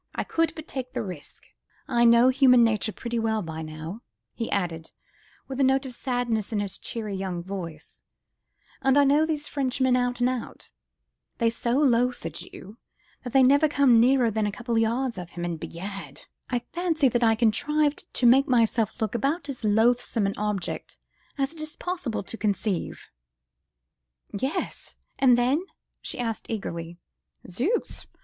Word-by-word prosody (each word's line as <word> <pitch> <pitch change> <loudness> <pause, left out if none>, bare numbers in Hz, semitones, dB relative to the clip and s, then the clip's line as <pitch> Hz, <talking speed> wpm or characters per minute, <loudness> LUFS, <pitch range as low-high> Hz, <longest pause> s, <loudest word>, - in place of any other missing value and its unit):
I - - -1
could 330 0 0
but 315 - -9
take 255 -2 -5
the - - -2
risk. 180 -7 -9 0.4
I 240 -3 +3
know 235 +2 +6
human 255 -2 +6
nature 220 -1 +1
pretty 235 +2 -4
well 220 -2 0
by 160 -1 -6
now," 160 +7 -7 0.3
he 230 - -4
added, 170 -5 -2 0.6
with 270 0 -5
a - - +4
note 265 +1 +3
of 255 - -7
sadness 240 -4 -2
in 215 - 0
his 200 -2 -3
cheery, 215 -3 -5
young 190 -3 -3
voice, 170 -5 -7 0.8
"and 270 +1 +3
I 285 - +7
know 290 +3 +4
these 300 -2 -2
Frenchmen 260 -2 +1
out 245 0 0
and 245 - +3
out. 255 -2 -5 0.7
They 230 -1 +2
so 235 +1 -1
loathe 250 - +2
a 165 - -3
Jew, 195 +6 -10 0.5
that 245 - -6
they 270 +1 +5
never 285 +4 +5
come 280 -5 +4
nearer 245 -1 +4
than 215 0 0
a - - -2
couple 235 +3 -4
of 225 - +3
yards 235 -1 0
of 175 -1 -7
him, 175 - -2
and 170 -2 -3
begad! 195 +5 -8 0.2
I 245 -2 -1
fancy 330 -4 +2
that 240 0 0
I 225 -1 +4
contrived 290 +7 +1
to 250 - +1
make 260 +3 +6
myself 230 -2 +2
look 215 - -2
about 280 +5 -1
as 260 -3 -6
loathsome 225 +1 +2
an 195 - 0
object 210 -3 -3 0.4
as 275 +2 -1
it 320 - -9
is 310 0 -5
possible 350 - -3
to 225 - -7
conceive." 200 -3 -2 1.2
"Yes!—and 260 +1 -1
then?" 260 +7 +2 0.4
she - - -5
asked 230 -3 -4
eagerly. 170 -6 -5 0.5
"Zooks! 270 - -2
235 Hz, 170 wpm, -26 LUFS, 205-265 Hz, 1.2 s, I